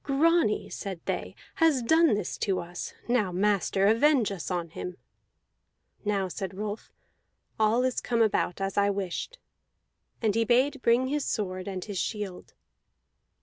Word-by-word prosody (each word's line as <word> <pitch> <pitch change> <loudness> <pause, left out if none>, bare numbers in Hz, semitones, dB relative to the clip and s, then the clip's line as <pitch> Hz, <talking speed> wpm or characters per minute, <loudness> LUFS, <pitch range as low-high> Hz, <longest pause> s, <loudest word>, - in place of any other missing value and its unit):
"Grani," 300 -3 +2
said 195 -4 -6
they, - - -3 0.2
"has 315 -7 +3
done 320 +1 +4
this 205 -3 -3
to 195 -2 0
us. 175 +1 -6
Now, 230 -6 +2
master, 195 0 +1
avenge 230 +1 +4
us 190 -4 -5
on 175 -2 -2
him!" 180 +2 -6 1.1
"Now," 200 -2 0
said 190 +1 -5
Rolf, 210 +2 -5 0.7
"all 220 +3 +3
is 255 -1 0
come 235 -2 +2
about 195 -4 0
as 195 0 -3
I 200 0 +3
wished." 200 - -3 0.8
And 220 -3 +1
he 230 +2 +2
bade 255 +4 +2
bring 245 +2 +3
his 295 0 0
sword 185 -3 -3
and 190 -2 -4
his 205 -3 -4
shield. 205 -4 -4
210 Hz, 145 wpm, -28 LUFS, 190-250 Hz, 1.1 s, done